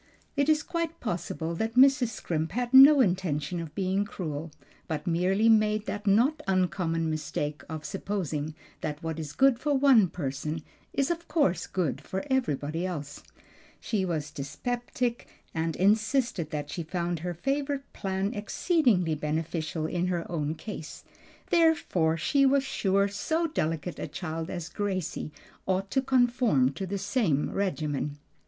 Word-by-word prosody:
It 285 +1 +2
is 305 -1 +3
quite 335 -1 -3
possible 170 -5 -3
that 220 +6 -2
Mrs. 265 0 +6
Scrimp 165 -6 -3
had 245 +2 -2
no 275 +2 +10
intention 175 - 0
of 165 -2 -7
being 190 +1 +1
cruel, 165 -6 -5 0.4
but 155 0 -3
merely 185 +5 +2
made 215 -1 +4
the 205 - -3
not 240 +10 +3
uncommon 180 -3 +1
mistake 150 -1 -3
of 160 -1 -6
supposing 160 -7 -3 0.2
that 150 0 -4
what 160 -1 -3
is 150 -3 -5
good 265 +4 +4
for 295 -1 +1
one 265 -7 +6
person 150 0 -4 0.3
is 275 +3 +1
of 340 0 -4
course 190 - +1
good 175 -7 -1
for 190 +8 -4
everybody 165 - 0
else. 150 -6 -5 0.6
She 210 -4 -1
was 155 -5 -2
dyspeptic, 240 - -3 0.3
and 160 -1 -1
insisted 210 - +2
that 150 -1 -4
she 175 - -3
found 170 +1 -2
her 175 +2 -4
favorite 275 - -1
plan 195 +2 -2
exceedingly 210 - +2
beneficial 155 +1 -2
in 175 +2 -1
her 175 -2 -1
own 155 -2 -1
case; 165 -4 -8 0.5
therefore 305 - +3
she 275 - +2
was 275 0 +4
sure 200 -6 +1
so 315 +12 -1
delicate 170 - -2
a - - -3
child 160 0 -5
as 175 -3 -4
Gracie 185 -7 -3 0.4
ought 190 +1 0
to 265 - +2
conform 245 - +3
to 190 +6 -4
the 200 +2 -2
same 195 - 0
regimen. 150 -7 -2
185 Hz, 145 wpm, -28 LUFS, 160-240 Hz, 0.6 s, no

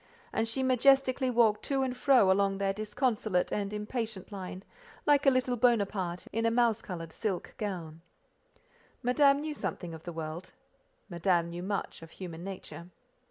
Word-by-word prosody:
And 225 - +1
she 260 +4 -1
majestically 260 0 +4
walked 225 -3 +3
to 270 -1 +1
and 255 -1 -2
fro 250 -7 +5
along 195 0 +2
their 195 0 0
disconsolate 215 -2 0
and 200 -1 -2
impatient 210 -1 -4
line, 190 -1 -7 0.4
like 290 -1 +4
a - - +11
little 255 -1 +1
Bonaparte 200 -7 +1
in 225 - 0
a 230 - +4
mouse 230 -1 +2
coloured 165 -3 -7
silk 195 -5 -3
gown. 170 -6 -5 1.0
Madame 275 +3 +4
knew 305 0 -3
something 175 - -5
of 160 - -9
the 175 - -7
world; 165 +2 -6 0.5
Madame 170 -2 +1
knew 175 +1 -5
much 195 -1 -3
of 165 - -11
human 170 -1 -8
nature. 175 -3 -8
210 Hz, 160 wpm, -30 LUFS, 180-250 Hz, 1.0 s, a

